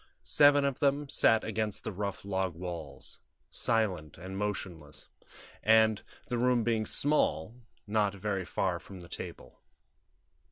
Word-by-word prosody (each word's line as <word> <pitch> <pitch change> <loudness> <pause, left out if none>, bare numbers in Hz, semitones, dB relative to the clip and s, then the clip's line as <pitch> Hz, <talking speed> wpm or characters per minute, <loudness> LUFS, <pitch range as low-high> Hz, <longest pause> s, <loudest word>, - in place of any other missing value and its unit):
Seven 145 -1 +5
of 140 -2 -1
them 145 +1 +1
sat 110 -4 +4
against 110 -1 -1
the - - -3
rough 100 0 -4
log 95 -3 -1
walls, 80 -6 -6 0.3
silent 95 -10 0
and 95 +3 -7
motionless, 95 -7 -5 0.5
and, 110 -1 +4 0.2
the 120 - -2
room 125 -1 +3
being 110 -2 0
small, 140 - +1 0.3
not 105 -1 +1
very 100 -1 -2
far 90 0 -1
from 95 0 -11
the 85 - -11
table. - - -8
105 Hz, 130 wpm, -31 LUFS, 90-115 Hz, 0.5 s, Seven